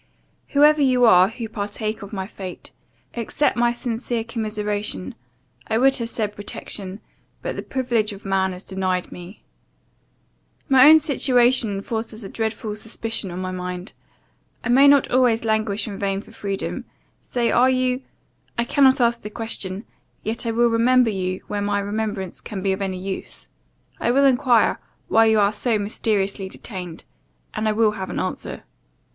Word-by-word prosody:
"Whoever 300 +1 +6
you 255 -3 +4
are, 185 -4 +7
who 225 +2 -6
partake 215 +1 -4
of 200 - -9
my 190 -3 -3
fate, 190 -2 -9 0.4
accept 235 +5 0
my 240 0 +3
sincere 240 -1 -3
commiseration 210 - -3 0.5
I 220 - +1
would 270 +3 +4
have 230 -1 -3
said 210 -3 -3
protection; 200 -1 -5 0.4
but - - -3
the - - -4
privilege 240 -5 -1
of 200 +1 -11
man 190 -1 +1
is 180 - -11
denied 185 -1 -2
me. 180 +3 -11 1.2
"My 265 0 +8
own 315 - +10
situation 245 -8 +2
forces 225 -1 -4
a 195 - -7
dreadful 220 -1 -3
suspicion 225 -1 -4
on 175 - -6
my 185 0 -3
mind 180 +1 -5 0.7
I - - -3
may 270 +3 +6
not 280 -1 +5
always 245 -3 +3
languish 215 -1 0
in 200 -2 -6
vain 195 -1 -1
for 215 - -13
freedom 200 -3 -4 0.4
say 240 -2 -1
are 250 +2 +5
you 255 0 +1 0.6
I 235 - +2
cannot 265 +2 +4
ask 235 -1 +2
the 210 - -6
question; 210 -3 -4 0.4
yet 225 +2 -3
I - - +1
will 235 +1 +3
remember 240 +1 +4
you 185 -2 -3
when 205 -1 -3
my 205 0 +1
remembrance 205 -2 -3
can 195 -4 -6
be 195 - +2
of 190 - -5
any 190 -1 -2
use. 190 +1 -7 0.5
I - - 0
will 275 +3 +4
enquire, 250 -4 +3 0.3
why 225 +1 +5
you 220 -1 +4
are 205 +1 +3
so 230 +1 0
mysteriously 200 -2 -1
detained 180 -5 -8 0.5
and 220 - -1
I - - +1
will 220 0 +3
have 190 -3 -6
an - - -3
answer. - - -4
220 Hz, 165 wpm, -22 LUFS, 195-240 Hz, 1.2 s, own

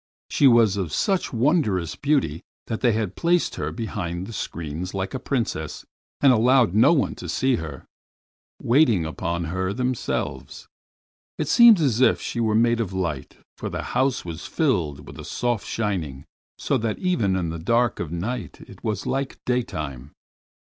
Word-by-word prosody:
She 140 - +5
was 115 -5 +5
of 90 -6 -2
such 190 - 0
wondrous 115 - +1
beauty 135 - 0 0.2
that 110 -1 -4
they 115 -3 +2
placed 170 - 0
her - - -2
behind 95 -6 -4
the 115 - -9
screens 85 0 -5
like 95 0 -3
a 130 - -3
princess, 115 - -3 0.4
and 135 -2 +6
allowed 120 -2 +4
no 110 +9 +6
one 170 - +2
to - - -8
see - - +1
her, - - -7 0.7
waiting 120 - +3
upon 85 +2 -3
her 95 +4 -2
themselves. 125 +2 -3 0.7
It - - -2
seemed 235 -5 +7
as 130 -6 +1
if 130 - +4
she - - -4
were 110 -2 +1
made 115 +1 +3
of 100 -5 -2
light, 85 -8 -3 0.2
for - - -4
the - - -4
house 130 -5 +1
was 85 -1 -6
filled 85 - 0
with - - -11
a - - -7
soft 120 -3 -2
shining, 85 -11 -3 0.3
so - - 0
that 110 -1 -2
even 115 - +1
in 90 -3 -1
the 85 0 -5
dark 115 +7 +1
of 80 -3 -4
night 95 - -4
it - - -14
was 105 -3 -2
like 135 0 -2
daytime. 75 - -3
110 Hz, 165 wpm, -24 LUFS, 85-125 Hz, 0.7 s, seemed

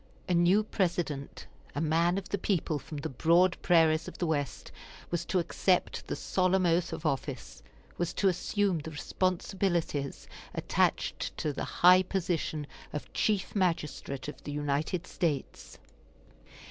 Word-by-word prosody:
A 180 - +1
new 175 +5 +4
President, 175 -9 -2 0.3
a - - -1
man 165 +3 +2
of 195 - -5
the 200 - -1
people 170 -6 0
from 150 - -8
the 145 +2 -3
broad 170 +7 +4
prairies 160 -2 +4
of - - -8
the 175 - -1
West, 145 -4 -2 0.4
was 175 - -1
to 190 - 0
accept 180 +1 +1
the - - -2
solemn 185 0 +1
oath 170 +1 +2
of 160 - -6
office, 130 - -3 0.4
was 175 - 0
to 200 - +2
assume 190 0 +1
the 155 +2 -6
responsibilities 170 -2 -1 0.3
attached - - 0
to 150 - -1
the - - -3 0.2
high 180 +1 +9
position 175 -5 -2 0.3
of 150 - -6
Chief 205 -2 0
Magistrate 150 -7 -1
of 150 - -8
the 145 - -5
United 145 +4 -1
States. 155 -8 -3
170 Hz, 145 wpm, -30 LUFS, 150-185 Hz, 0.4 s, high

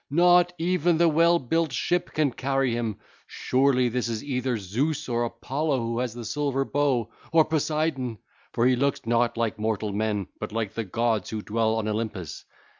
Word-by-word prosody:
Not 175 +3 +5
even 175 0 +1
the 170 +1 +4
well 165 +2 +4
built 165 +2 0
ship 175 +6 -1
can 150 -3 +2
carry 135 +1 0
him. 115 -3 -2 0.3
Surely 130 -1 +2
this 120 0 -1
is 115 -2 -3
either 130 -3 -1
Zeus 135 - -2
or 120 -1 0
Apollo 140 +4 -2
who 115 0 -2
has 125 -2 -2
the 120 -1 -7
silver 135 +2 -1
bow, 135 -6 0 0.2
or 160 -1 +5
Poseidon, 155 -6 -1 0.3
for 115 - +1
he 130 0 +4
looks 140 0 0
not 115 +1 +1
like 115 -2 -1
mortal 110 -1 -1
men 105 -1 -1
but 110 - -5
like 110 -2 -2
the 115 - -3
gods 115 0 0
who 110 -1 -4
dwell 110 +1 0
on 110 -1 -2
Olympus. 105 -6 -4
125 Hz, 180 wpm, -26 LUFS, 115-150 Hz, 0.3 s, Not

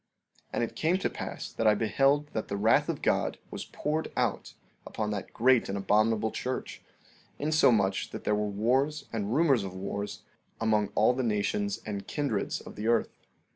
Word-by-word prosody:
14:15 - - -42
And - - 0
it 115 - -4
came 165 +4 +2
to 190 - -1
pass - - -6
that 115 - +1
I 105 - +6
beheld 135 +7 +2
that 110 - -2
the 100 - -3
wrath 110 +3 +3
of - - -3
God - - +1
was - - -5
poured 155 +1 -2
out - - -1 0.3
upon 105 -1 -3
that 100 -2 -4
great 125 -1 +3
and 100 - -2
abominable 110 +2 +2
church, 130 +1 -4 0.6
insomuch 120 -10 +3
that - - -7
there 105 - +1
were 105 0 0
wars 130 +9 +1
and 110 +1 -1
rumors 140 -9 +4
of 95 -1 -6
wars 100 +2 -5 0.4
among 110 -2 +2
all 110 +4 +4
the 130 - -1
nations 105 -3 -1
and 100 -2 -5
kindreds 140 -9 -1
of - - -11
the 105 +2 -3
earth. 115 -1 +1
110 Hz, 180 wpm, -29 LUFS, 105-130 Hz, 0.6 s, I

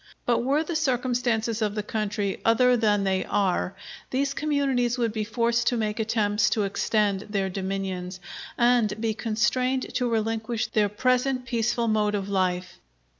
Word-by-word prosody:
But 240 -1 +2
were 280 +5 +2
the 330 +1 -4
circumstances 245 -5 0
of 210 -1 0
the 210 - -2
country 210 -2 -2
other 250 +2 +4
than 210 -3 +2
they 190 -1 +1
are 195 -2 0 0.3
these 275 +2 0
communities 275 -5 0
would 230 -3 0
be 215 -1 -1
forced 235 +2 0
to 245 - +2
make 215 0 -2
attempts 210 -1 +1
to 215 - +1
extend 200 0 0
their 195 -2 -1
dominions, 190 -1 -4 0.4
and 235 -4 +3
be 225 -1 0
constrained 250 +4 0
to 250 -1 0
relinquish 225 0 -1
their 210 -2 +1
present 255 +4 +1
peaceful 235 -1 0
mode 210 -1 +1
of 200 -1 -3
life. 185 -2 -1
220 Hz, 155 wpm, -26 LUFS, 205-245 Hz, 0.4 s, other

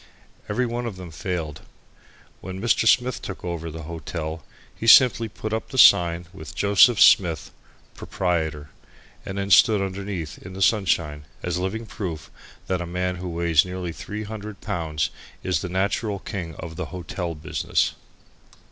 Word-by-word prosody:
Every 125 - +1
one 120 0 -3
of 110 - -5
them 90 -2 -9
failed. 80 -2 -4 0.8
When 95 +1 -7
Mr. 115 +1 +2
Smith 125 +2 +3
took 95 - -7
over 85 -2 -4
the 80 +1 -8
hotel 80 0 -5 0.3
he 115 - -6
simply 115 -2 +7
put 110 +1 -5
up 110 - -3
the 130 - -6
sign 85 -6 +6
with 85 -5 -10
"JOS. 100 +4 +5
SMITH, 85 -5 +5 0.4
PROP.," - - -8 1.0
and 95 - -5
then 100 0 -2
stood 105 +3 +6
underneath 95 -5 -4
in 90 - -10
the 95 - -7
sunshine 80 -8 +1 0.2
as 90 -1 -1
a - - -2
living 110 +5 -3
proof 80 -9 -6 0.3
that 95 -1 -1
a 90 - -4
man 90 +1 -2
who 90 0 -5
weighs 85 -2 +3
nearly 90 -1 -5
three 105 +6 -6
hundred 105 -1 -7
pounds 80 -7 -2 0.3
is 95 - 0
the 90 - -4
natural 100 +3 -1
king 90 -5 -6
of 80 0 -8
the 95 - -3
hotel 90 -1 -5
business. 75 - -1
90 Hz, 160 wpm, -24 LUFS, 85-105 Hz, 1.0 s, simply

